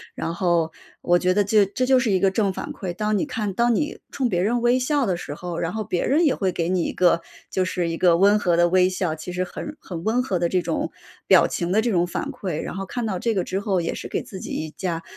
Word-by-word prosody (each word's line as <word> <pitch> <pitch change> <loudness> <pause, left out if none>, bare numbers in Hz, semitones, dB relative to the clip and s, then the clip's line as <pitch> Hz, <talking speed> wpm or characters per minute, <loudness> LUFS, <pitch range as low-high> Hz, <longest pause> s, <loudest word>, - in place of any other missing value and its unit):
然 165 - -3
后 170 -2 +1 0.3
我 175 0 +3
觉 185 +1 +1
得 205 - +4
这 205 0 +3
这 255 +6 -1
就 260 0 +4
是 245 -4 0
一 190 -2 +3
个 195 0 +3
正 200 -1 +1
反 - - -6
馈。 185 - -5
当 210 +1 0
你 205 - +1
看 215 -7 -3
当 235 +3 +2
你 300 +5 -2
冲 265 -3 0
别 175 -6 0
人 235 +6 +1
微 245 +1 +3
笑 280 +2 +1
的 190 -4 0
时 150 -4 -6
候， 175 -1 -5
然 165 +1 -1
后 220 0 -3
别 180 -2 -1
人 315 +5 +3
也 285 - +4
会 190 -2 0
给 170 -1 -2
你 180 -1 +1
一 - - -2
个 175 -2 +3 0.3
就 185 - +1
是 180 -2 -1
一 165 - -2
个 170 -1 +4
温 200 +3 +5
和 175 -4 +1
的 175 0 +4
微 185 0 +4
笑， 185 -3 -1
其 160 +3 -7
实 180 +1 -1
很 300 +10 -7
很 170 -3 -7
温 235 +5 +1
和 190 -8 -1
的 170 0 +1
这 180 -1 +1
种 - - -2 0.4
表 - - +6
情 175 0 -2
的 210 - +3
这 235 - 0
种 175 -2 +2
反 - - -3
馈， 180 -6 -4
然 - - -6
后 195 - -3
看 240 +3 -3
到 190 -5 -2
这 230 -3 0
个 185 - +1
之 190 +1 -2
后 200 -3 0
也 165 - -2
是 - - -6
给 - - -3
自 190 - -9
己 - - -7
一 155 -1 -4
加 170 -2 -3
185 Hz, 305 characters per minute, -23 LUFS, 175-220 Hz, 0.4 s, 表